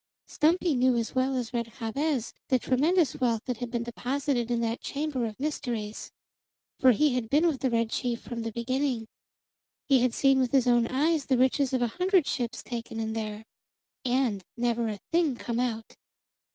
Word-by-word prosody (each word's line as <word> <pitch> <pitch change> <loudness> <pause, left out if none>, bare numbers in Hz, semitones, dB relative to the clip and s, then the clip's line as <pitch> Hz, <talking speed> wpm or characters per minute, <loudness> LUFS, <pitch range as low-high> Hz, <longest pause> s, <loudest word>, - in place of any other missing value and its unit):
Stumpy 335 +1 +2
knew 255 0 +3
as 230 -1 -2
well 260 +1 +1
as 245 -1 -3
Red 235 -2 -3
Jabez 255 +2 -1
the 260 - +3
tremendous 295 +7 +2
wealth 230 -3 +1
that 250 -2 -2
had 245 0 -5
been 235 -1 -2
deposited 245 +1 -2
in 240 -1 +1
that 230 0 -2
chamber 285 -4 -2
of 215 +1 -9
mysteries; 235 -7 -4 0.7
for 260 - +7
he 285 +4 +3
had 245 -3 -2
been 295 +6 +3
with 310 -6 +1
the 265 - +1
red 230 -1 0
chief 240 -3 -1
from 235 -1 -6
the 225 0 -3
beginning; 245 0 -1 0.8
he 270 -2 +5
had 245 -1 +1
seen 270 -1 +4
with 255 0 0
his 265 -2 +4
own 240 -1 +3
eyes 295 +3 +1
the 260 - +3
riches 260 +1 +2
of 255 -2 +1
a - - +2
hundred 370 -3 +4
ships 240 -2 -3
taken 230 -2 -5
in 220 0 -2
there, 215 -1 -4 0.6
and 245 -6 0
never 235 -1 0
a 210 - -4
thing 330 -5 +2
come 235 0 -3
out. 225 -3 -3
250 Hz, 190 wpm, -28 LUFS, 230-275 Hz, 0.8 s, for